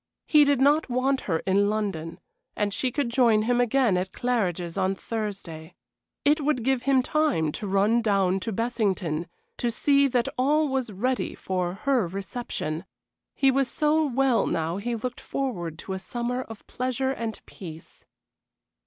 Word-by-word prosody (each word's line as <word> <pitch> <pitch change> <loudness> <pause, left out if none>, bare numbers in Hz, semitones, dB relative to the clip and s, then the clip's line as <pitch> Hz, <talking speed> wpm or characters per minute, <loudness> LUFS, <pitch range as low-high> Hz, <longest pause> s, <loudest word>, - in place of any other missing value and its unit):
He 300 -1 +6
did 285 -2 +2
not 290 +2 +3
want 260 +2 +1
her 165 -2 0
in 200 +1 +3
London, 195 -7 -3 0.4
and 205 -1 -1
she 255 +3 -1
could 280 -2 -1
join 235 -4 +4
him 245 +2 +2
again 245 -4 +3
at 185 +1 -2
Claridge's 185 -9 -1
on 190 0 +1
Thursday. 195 -7 -5 0.5
It 300 +2 +4
would 285 -5 0
give 265 0 +1
him 265 -2 +4
time 280 - +1
to 205 - -5
run 200 +5 +3
down 195 -4 +2
to 225 - -4
Bessington 195 -8 -1 0.3
to 240 - 0
see 280 +4 +3
that 245 -2 +1
all 300 +4 +3
was 260 -4 -1
ready 250 +6 -1
for 180 -1 -2
her 260 -9 +3
reception. 190 -3 -4 0.5
He 270 -1 +4
was 270 0 +2
so 305 +4 +2
well 270 -3 +2
now 165 +2 -1
he 235 +4 -2
looked 245 +2 -5
forward 180 - -3
to 190 - -6
a 190 - -3
summer 240 +5 -3
of 225 -4 -10
pleasure 255 +1 -1
and 230 -4 -4
peace. 165 -4 -11
230 Hz, 160 wpm, -26 LUFS, 190-265 Hz, 0.5 s, He